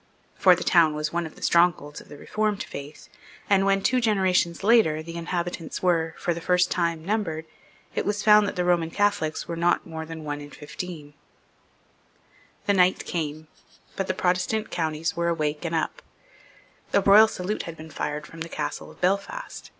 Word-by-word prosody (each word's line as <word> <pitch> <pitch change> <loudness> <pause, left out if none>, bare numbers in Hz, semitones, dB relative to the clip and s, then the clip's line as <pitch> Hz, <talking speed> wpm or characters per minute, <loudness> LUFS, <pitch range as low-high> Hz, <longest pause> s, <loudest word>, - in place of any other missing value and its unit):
For 185 -2 +5
the 175 - -4
town 165 -3 +4
was 150 +1 -3
one 170 -1 -1
of 155 - -14
the - - -12
strongholds 170 -4 +2
of - - -18
the 145 - -10
Reformed 215 +4 -1
Faith, 140 +2 -9 0.4
and, 195 -1 +3
when, 195 0 +2
two 255 0 +2
generations 190 -5 +1
later, 195 -9 +4
the 165 +1 -8
inhabitants 170 0 -4
were, 165 -3 +1
for 175 - -1
the 170 - -7
first 180 +1 +2
time, 170 -2 -1
numbered, 180 -6 -2 0.5
it - - -1
was 205 0 -2
found 210 -1 +6
that - - -4
the 180 - 0
Roman 175 -2 +2
Catholics 200 -4 0
were 170 - -4
not 170 +1 +1
more 160 -1 -7
than 160 -1 -7
one 145 -1 -4
in 145 - -9
fifteen, 150 0 -8 1.5
The 200 - +3
night 185 -1 +3
came; 155 -2 -4 0.5
but 195 - -2
the 185 - -1
Protestant 185 +5 0
counties 160 0 -2
were 170 0 0
awake 155 -2 -1
and 165 0 -1
up. 160 - -2 0.9
A 200 - +5
royal 205 +3 +7
salute 200 0 -3
had 165 - -8
been 160 0 -10
fired 150 +1 -4
from 165 - -12
the 165 - -5
castle - - -4
of - - -16
Belfast. 200 - -2
170 Hz, 185 wpm, -25 LUFS, 160-195 Hz, 1.5 s, royal